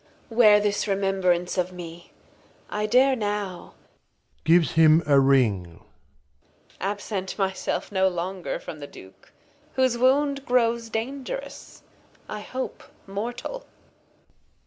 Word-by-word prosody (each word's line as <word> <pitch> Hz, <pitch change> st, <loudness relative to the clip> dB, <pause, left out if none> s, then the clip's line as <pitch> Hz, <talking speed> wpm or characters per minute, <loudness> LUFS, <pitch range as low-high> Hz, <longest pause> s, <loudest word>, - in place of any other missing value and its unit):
Wear 215 Hz, -3 st, +6 dB
this 205 Hz, 0 st, 0 dB
Remembrance 190 Hz, -2 st, +1 dB
of 180 Hz, 0 st, -1 dB
me. 170 Hz, -1 st, -10 dB, 0.6 s
1 210 Hz, 0 st, -2 dB
dare 260 Hz, +4 st, +4 dB
now 205 Hz, -5 st, -4 dB, 0.7 s
[Gives 165 Hz, +1 st, +4 dB
him 160 Hz, 0 st, +5 dB
a 140 Hz, -2 st, +5 dB
Ring. 110 Hz, -11 st, +2 dB, 1.0 s
Absent 195 Hz, 0 st, -3 dB
my 190 Hz, -2 st, 0 dB
self -, -, -3 dB
no 190 Hz, -1 st, +3 dB
longer 180 Hz, 0 st, -3 dB
from 155 Hz, -, -9 dB
the 145 Hz, -, -7 dB
Duke, 95 Hz, -7 st, -15 dB, 0.4 s
Whose 255 Hz, -2 st, +2 dB
Wound 275 Hz, +2 st, +2 dB
grows 235 Hz, -2 st, +1 dB
Dangerous, 265 Hz, -, -6 dB, 0.4 s
I 215 Hz, -, -5 dB
hope 255 Hz, +5 st, -6 dB, 0.2 s
Mortal. 240 Hz, -, -5 dB
200 Hz, 110 wpm, -25 LUFS, 175-235 Hz, 1.0 s, Wear